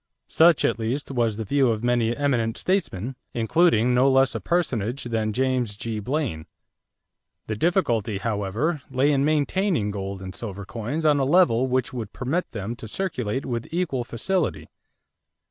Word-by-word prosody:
Such, 165 Hz, -1 st, +4 dB
at -, -, 0 dB
least, 125 Hz, +6 st, -2 dB
was 115 Hz, -5 st, 0 dB
the 110 Hz, -, -4 dB
view 135 Hz, +3 st, +2 dB
of 110 Hz, 0 st, -1 dB
many 120 Hz, -1 st, +1 dB
eminent 120 Hz, -6 st, 0 dB
statesmen, 135 Hz, -, -1 dB, 0.2 s
including 125 Hz, 0 st, +3 dB
no 130 Hz, +2 st, +4 dB
less 135 Hz, 0 st, +4 dB
a -, -, -3 dB
personage 130 Hz, -, -1 dB
than 110 Hz, -2 st, -1 dB
James 125 Hz, -2 st, 0 dB
G. 110 Hz, 0 st, -4 dB
Blaine. 120 Hz, -, -2 dB, 1.0 s
The 110 Hz, -, -3 dB
difficulty, 115 Hz, -, +1 dB
however, 110 Hz, -, -1 dB
lay 135 Hz, +3 st, +2 dB
in 140 Hz, -1 st, +2 dB
maintaining 155 Hz, -, +1 dB
gold 95 Hz, -1 st, -5 dB
and 95 Hz, 0 st, -7 dB
silver 100 Hz, -2 st, -6 dB
coins 115 Hz, +10 st, -4 dB
on 150 Hz, -2 st, +4 dB
a -, -, +2 dB
level 135 Hz, -5 st, +4 dB
which 130 Hz, 0 st, 0 dB
would 115 Hz, -5 st, -5 dB
permit 140 Hz, +8 st, -2 dB
them 110 Hz, +1 st, -5 dB
to 110 Hz, -, -8 dB
circulate 130 Hz, -, -2 dB
with 120 Hz, -2 st, -3 dB
equal 160 Hz, -8 st, -1 dB
facility. 115 Hz, -, -2 dB
120 Hz, 160 wpm, -24 LUFS, 110-145 Hz, 1.0 s, Such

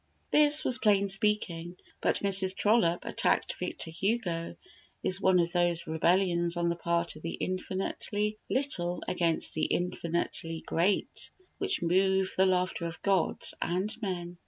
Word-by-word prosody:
This 300 Hz, 0 st, +5 dB
was 250 Hz, -, +5 dB
plain 200 Hz, -2 st, +2 dB
speaking; 185 Hz, -4 st, 0 dB, 0.2 s
but -, -, 0 dB
Mrs. 190 Hz, -1 st, +2 dB
Trollope 200 Hz, -5 st, +2 dB
attacking -, -, 0 dB
Victor 160 Hz, -, -4 dB
Hugo 175 Hz, -1 st, -2 dB, 0.5 s
is 190 Hz, +1 st, +2 dB
one 190 Hz, -1 st, +4 dB
of 170 Hz, 0 st, 0 dB
those 175 Hz, -1 st, +1 dB
rebellions 170 Hz, +1 st, +1 dB
on 170 Hz, 0 st, 0 dB
the 170 Hz, -, -1 dB
part 170 Hz, -1 st, -1 dB
of 155 Hz, -, -12 dB
the 165 Hz, -, -4 dB
infinitely 205 Hz, +3 st, -3 dB
little 180 Hz, -11 st, 0 dB
against 170 Hz, -3 st, 0 dB
the 155 Hz, -, 0 dB
infinitely 170 Hz, -2 st, -2 dB
great 180 Hz, +5 st, -1 dB, 0.3 s
which 395 Hz, -, -1 dB
move 190 Hz, +2 st, +2 dB
the 190 Hz, 0 st, +3 dB
laughter 180 Hz, -2 st, 0 dB
of 165 Hz, -1 st, -9 dB
gods 195 Hz, -3 st, 0 dB
and 185 Hz, +5 st, -1 dB
men. 175 Hz, -4 st, -5 dB
180 Hz, 140 wpm, -29 LUFS, 170-195 Hz, 0.5 s, This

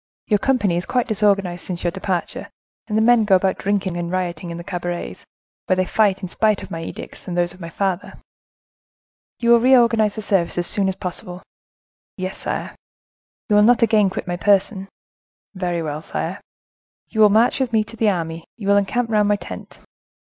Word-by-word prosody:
Your 210 Hz, -2 st, +2 dB
company 210 Hz, -8 st, +1 dB
is 175 Hz, -, -4 dB
quite 250 Hz, -2 st, 0 dB
disorganized 195 Hz, -5 st, +1 dB
since 175 Hz, -2 st, -5 dB
your 175 Hz, -, +1 dB
departure, 190 Hz, -2 st, -3 dB, 0.4 s
and 215 Hz, -1 st, -1 dB
the 220 Hz, -, +3 dB
men 240 Hz, -1 st, +5 dB
go 200 Hz, -2 st, +4 dB
about 190 Hz, 0 st, +1 dB
drinking 195 Hz, -3 st, -1 dB
and 170 Hz, -1 st, -3 dB
rioting 180 Hz, -2 st, -3 dB
in 170 Hz, -, -6 dB
the 170 Hz, -, -7 dB
cabarets, 175 Hz, -1 st, -5 dB, 0.4 s
where 185 Hz, -, +3 dB
they 185 Hz, 0 st, +1 dB
fight, 195 Hz, -1 st, +1 dB
in -, -, -2 dB
spite 215 Hz, +2 st, +1 dB
of -, -, -10 dB
my 165 Hz, -, -4 dB
edicts, 165 Hz, -, -8 dB
and 175 Hz, -1 st, -3 dB
those 175 Hz, 0 st, +1 dB
of 180 Hz, -, -17 dB
my 165 Hz, -, -6 dB
father. 190 Hz, +1 st, -2 dB, 1.2 s
You 235 Hz, -1 st, +2 dB
will 235 Hz, -, +7 dB
reorganize 230 Hz, -4 st, +4 dB
the 215 Hz, -, -5 dB
service 190 Hz, -5 st, 0 dB
as 175 Hz, -, +2 dB
soon 195 Hz, +1 st, +2 dB
as 190 Hz, -, -3 dB
possible." 180 Hz, -1 st, -6 dB, 0.7 s
"Yes, 185 Hz, 0 st, -5 dB
sire." -, -, -4 dB, 0.7 s
"You 210 Hz, -3 st, +3 dB
will -, -, +6 dB
not 235 Hz, +2 st, +5 dB
again 215 Hz, -3 st, +4 dB
quit 185 Hz, -, -5 dB
my 175 Hz, 0 st, -3 dB
person." 195 Hz, +2 st, +1 dB, 0.6 s
"Very 175 Hz, -3 st, -2 dB
well, 150 Hz, -1 st, -4 dB
sire." -, -, -4 dB, 0.7 s
"You 220 Hz, -, 0 dB
will 210 Hz, -, +8 dB
march 225 Hz, +6 st, +3 dB
with 260 Hz, -3 st, 0 dB
me 220 Hz, -1 st, +3 dB
to 225 Hz, +2 st, -12 dB
the 220 Hz, -1 st, +2 dB
army, 165 Hz, -3 st, -3 dB
you 205 Hz, -4 st, -6 dB
will 200 Hz, 0 st, +5 dB
encamp 225 Hz, +4 st, 0 dB
round 210 Hz, -1 st, +3 dB
my 205 Hz, -, +3 dB
tent." -, -, -9 dB
195 Hz, 200 wpm, -21 LUFS, 175-215 Hz, 1.2 s, will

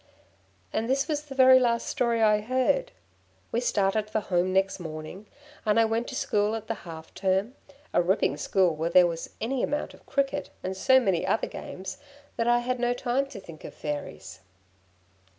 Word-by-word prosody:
'" 95 Hz, -1 st, -36 dB
And 225 Hz, +2 st, -1 dB
this 275 Hz, +2 st, +1 dB
was 300 Hz, -2 st, -1 dB
the 290 Hz, -3 st, -10 dB
very 260 Hz, -1 st, +8 dB
last 235 Hz, -2 st, +1 dB
story 235 Hz, -2 st, +1 dB
I 210 Hz, -1 st, +4 dB
heard. 260 Hz, -, +1 dB, 0.6 s
We 230 Hz, -, +1 dB
started 210 Hz, -2 st, +1 dB
for 215 Hz, -, 0 dB
home 185 Hz, -2 st, 0 dB
next 190 Hz, +1 st, +1 dB
morning, 160 Hz, +4 st, -8 dB, 0.4 s
and 215 Hz, 0 st, +3 dB
I 225 Hz, -, +5 dB
went 225 Hz, +2 st, -1 dB
to 260 Hz, -, -6 dB
school 215 Hz, -6 st, +1 dB
at 225 Hz, -, -6 dB
the -, -, -2 dB, 0.2 s
half 160 Hz, -1 st, -10 dB
term 190 Hz, +4 st, 0 dB, 0.4 s
a -, -, +4 dB
ripping 175 Hz, -5 st, +1 dB
school 180 Hz, +1 st, +2 dB
where 160 Hz, +2 st, -1 dB
there 180 Hz, +1 st, +7 dB
was 165 Hz, -1 st, -3 dB
any 245 Hz, +3 st, -1 dB
amount 290 Hz, -, -2 dB
of -, -, -19 dB
cricket, 280 Hz, +1 st, -1 dB
and 185 Hz, +1 st, -3 dB
so 260 Hz, +7 st, +5 dB
many 190 Hz, -9 st, +1 dB
other -, -, +1 dB
games 190 Hz, +8 st, -7 dB, 0.4 s
that 230 Hz, -, -1 dB
I 240 Hz, 0 st, +4 dB
had 255 Hz, 0 st, -1 dB
no 245 Hz, 0 st, +1 dB
time 255 Hz, +2 st, 0 dB
to 240 Hz, -, -9 dB
think 165 Hz, -5 st, -12 dB
of -, -, -9 dB
Fairies. 150 Hz, -1 st, -6 dB
215 Hz, 190 wpm, -27 LUFS, 185-255 Hz, 0.6 s, very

